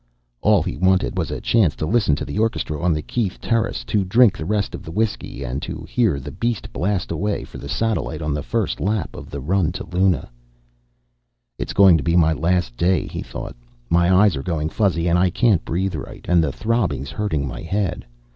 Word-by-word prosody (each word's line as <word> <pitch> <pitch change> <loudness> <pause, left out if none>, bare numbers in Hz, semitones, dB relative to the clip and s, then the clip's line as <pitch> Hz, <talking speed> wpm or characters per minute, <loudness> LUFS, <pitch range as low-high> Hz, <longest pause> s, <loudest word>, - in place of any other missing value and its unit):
All - - +4
he - - -4
wanted 95 +1 +2
was 85 -4 -1
a - - -4
chance 100 -10 +2
to - - -3
listen 100 -5 +2
to - - -4
the - - -4
orchestra 95 -9 -1
on 90 - +2
the 75 -1 -1
Keith 105 -2 -2
terrace, 115 - -1
to 100 - 0
drink 105 +2 +4
the 80 - -5
rest 105 -1 0
of - - -7
his 80 - -8
whiskey, 105 -10 -2
and 65 +3 -3
to - - -6
hear 110 - +1
the 70 +2 -7
beast 115 +4 -3
blast 95 +1 -1
away 100 +5 -1
for - - -10
the - - -8
satellite 110 -8 -1
on 75 -1 -1
the 75 - -2
first 115 +5 -2
lap 105 +1 -1
of - - -9
the 70 - -5
run 85 +5 +1
to - - -5
Luna. 90 -5 +1 1.3
It's - - -3
going 95 -4 +7
to 70 - -3
be 85 0 +1
my 80 -2 +4
last 85 -4 0
day, 90 -1 +2
he - - -5
thought. - - -7 0.4
My 85 +1 +4
eyes 95 -1 +5
are 65 - -3
going 80 0 -2
fuzzy, 90 -4 +1
and 85 +1 +3
I 90 0 +4
can't 100 -1 +2
breathe 95 +3 -1
right, 75 - -7
and 85 -2 +4
the 75 - 0
throbbing's 105 - -1
hurting 80 -10 -1
my 60 - -6
head. 95 +2 -2
90 Hz, 215 wpm, -21 LUFS, 80-105 Hz, 1.3 s, going